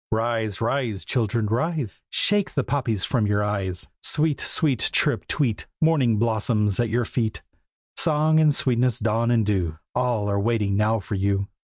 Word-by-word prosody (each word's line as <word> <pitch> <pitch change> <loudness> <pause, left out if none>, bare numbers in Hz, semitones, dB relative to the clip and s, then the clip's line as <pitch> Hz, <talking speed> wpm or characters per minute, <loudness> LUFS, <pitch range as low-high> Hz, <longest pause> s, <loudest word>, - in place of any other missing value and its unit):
Rise! 110 -2 -1
rise! 115 - -1
children, 115 0 0
rise! 130 - -2
Shake 205 -1 +1
the 140 - +1
poppies 115 -9 -1
from 115 -5 +1
your 105 0 +1
eyes. 95 -3 -2
Sweet! 150 -1 0
sweet! 140 -8 +1
chirrup! - - 0
tweet! 120 -8 -1
Morning 140 -9 +3
blossoms 110 -2 0
at 120 -1 +1
your 120 +2 0
feet. 110 -2 -2 0.5
Song 155 0 +3
and 155 -1 +5
sweetness, 125 -2 +1
dawn 115 +1 0
and 115 -3 +2
dew, 90 -6 -1 0.2
All 120 -4 0
are 100 0 0
waiting 105 -2 0
now 110 +2 +2
for 105 - -6
you. 100 0 0
115 Hz, 160 wpm, -24 LUFS, 105-125 Hz, 0.5 s, and